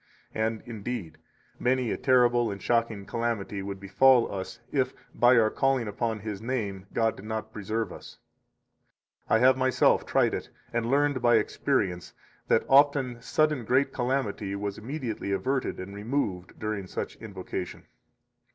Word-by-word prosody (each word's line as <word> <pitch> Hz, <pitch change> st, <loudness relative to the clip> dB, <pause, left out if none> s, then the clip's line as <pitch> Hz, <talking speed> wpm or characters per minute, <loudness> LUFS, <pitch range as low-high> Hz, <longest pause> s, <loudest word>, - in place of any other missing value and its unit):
And, 110 Hz, 0 st, -1 dB
indeed, 105 Hz, -8 st, -5 dB, 0.4 s
many 125 Hz, -2 st, +1 dB
a -, -, 0 dB
terrible 120 Hz, -2 st, +3 dB
and 100 Hz, -1 st, -5 dB
shocking 115 Hz, -3 st, 0 dB
calamity 115 Hz, -4 st, -2 dB
would 100 Hz, 0 st, -5 dB
befall 115 Hz, +5 st, +4 dB
us 95 Hz, +4 st, -6 dB
if, 135 Hz, -3 st, 0 dB, 0.2 s
by 120 Hz, +1 st, +5 dB
our 110 Hz, -1 st, +4 dB
calling 135 Hz, -4 st, +1 dB
upon 110 Hz, +1 st, -2 dB
His 105 Hz, -1 st, -5 dB
name, 105 Hz, -6 st, -3 dB
God 115 Hz, -1 st, +1 dB
did 95 Hz, -, -11 dB
not 110 Hz, 0 st, -4 dB
preserve 110 Hz, +2 st, -3 dB
us. -, -, -12 dB, 1.1 s
72 -, -, 0 dB
I -, -, +4 dB
have 130 Hz, 0 st, +5 dB
myself 130 Hz, 0 st, +3 dB
tried -, -, +2 dB
it, -, -, -4 dB, 0.2 s
and 115 Hz, 0 st, 0 dB
learned 140 Hz, -1 st, +2 dB
by 120 Hz, -1 st, +5 dB
experience 105 Hz, -5 st, 0 dB, 0.3 s
that -, -, +3 dB
often 135 Hz, -3 st, +4 dB
sudden 150 Hz, 0 st, +1 dB
great 130 Hz, +5 st, +2 dB
calamity 120 Hz, -6 st, -1 dB
was 100 Hz, 0 st, -4 dB
immediately 120 Hz, -4 st, -4 dB
averted 130 Hz, +7 st, -1 dB
and 95 Hz, +2 st, -7 dB
removed 100 Hz, -4 st, -3 dB
during 105 Hz, -3 st, -3 dB
such -, -, -5 dB
invocation. 95 Hz, -3 st, -6 dB
115 Hz, 150 wpm, -28 LUFS, 100-130 Hz, 1.1 s, by